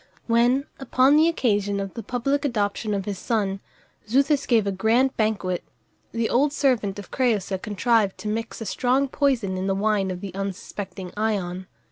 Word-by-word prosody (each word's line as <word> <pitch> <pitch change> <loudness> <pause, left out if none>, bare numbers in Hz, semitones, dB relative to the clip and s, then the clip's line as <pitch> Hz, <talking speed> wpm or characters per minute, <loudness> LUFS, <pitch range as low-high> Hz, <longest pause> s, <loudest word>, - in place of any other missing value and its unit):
When, 240 +4 +3
upon 270 +1 +4
the 315 +2 +5
occasion 205 -10 +1
of 195 -1 -4
the 230 - -5
public 250 +6 -1
adoption 210 -4 -1
of 195 -1 -3
his 200 -3 -4
son, 200 -4 -1 0.5
Xuthus 275 +3 +2
gave 225 -4 +3
a 200 - 0
grand 230 +7 +2
banquet, 195 -5 -1 0.5
the 230 -1 0
old 280 +4 +2
servant 240 -10 +1
of 205 - -9
Crëusa 205 -7 0
contrived 210 -1 +1
to 215 - -7
mix 225 +2 -3
a - - -4
strong 260 +5 +1
poison 250 -9 0
in 190 +1 -2
the 195 - +1
wine 200 -1 +1
of 180 -1 -4
the 195 -1 -7
unsuspecting 195 -1 -6
Ion. 190 -4 -2
215 Hz, 170 wpm, -24 LUFS, 195-250 Hz, 0.5 s, the